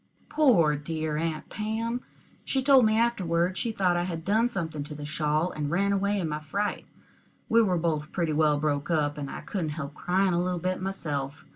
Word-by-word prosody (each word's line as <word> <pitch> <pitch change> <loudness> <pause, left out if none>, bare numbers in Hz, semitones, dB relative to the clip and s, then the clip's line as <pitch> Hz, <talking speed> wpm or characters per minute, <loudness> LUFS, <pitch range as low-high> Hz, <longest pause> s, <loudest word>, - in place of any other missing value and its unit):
Poor, 195 - +4
dear 155 +1 -3
Aunt 160 -1 -2
Pam! 225 +3 -2 0.4
she 265 -1 0
told 265 -3 +6
me 215 0 +3
afterward 185 -6 +1
she 230 - -1
thought 185 -4 +1
I 175 0 0
had 165 -2 -5
done 220 +5 +3
something 160 -9 -4
to 150 - -8
the 145 0 -7
shawl, 155 +2 0
and 150 -1 -3
ran 200 +5 +1
away 200 +1 +1
in 170 - -1
my 150 0 -3
fright. 200 +7 -3 0.6
We 230 +1 +5
were 185 -5 +2
both 155 -2 -1
pretty 170 -4 -1
well 150 -1 +3
broke 145 0 -1
up, 150 -3 0
and 140 -1 -4
I - - -6
couldn't 175 -6 -3
help 140 -2 -5
crying 185 +4 +1
a 170 - +2
little 180 0 -1
bit 185 +2 -2
myself. 145 -8 -4
170 Hz, 205 wpm, -27 LUFS, 150-200 Hz, 0.6 s, told